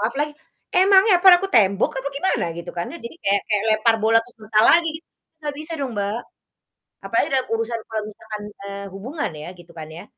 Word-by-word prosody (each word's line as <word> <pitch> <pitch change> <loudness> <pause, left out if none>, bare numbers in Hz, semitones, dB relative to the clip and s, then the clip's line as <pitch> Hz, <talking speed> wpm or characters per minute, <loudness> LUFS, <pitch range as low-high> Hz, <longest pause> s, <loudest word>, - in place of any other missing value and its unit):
maaf 215 +5 -1
lagi? 295 0 -1 0.4
Emangnya 385 +2 +5
apaan, 370 0 +8
aku 390 - 0
tembok 200 - +3
apa 275 - -3
gimana 375 - 0
gitu 170 - -7
kan. 170 0 -3
Ya, 340 - -8
jadi 235 - -9
kayak 200 0 +2
kayak 210 -2 +1
lempar 225 +1 +3
bola 225 +1 +5
terus 245 +1 -18
mental 215 +1 +3
lagi 335 0 +4
gitu, - - -63 0.4
nggak 295 -1 -3
bisa 310 +2 -7
dong, 275 -2 -3
Mbak. 205 +3 -2 0.8
Apalagi - - 0
dalam 260 -1 +1
urusan 230 0 -2
kalau 220 -1 -2
misalkan, 215 0 -8 0.3
eee, 200 0 -6
hubungan 255 +11 -4
ya, 150 0 -8
gitu 175 -1 -16
kan 160 -2 -8
ya. 160 +2 -10
225 Hz, 205 wpm, -22 LUFS, 200-295 Hz, 0.8 s, apaan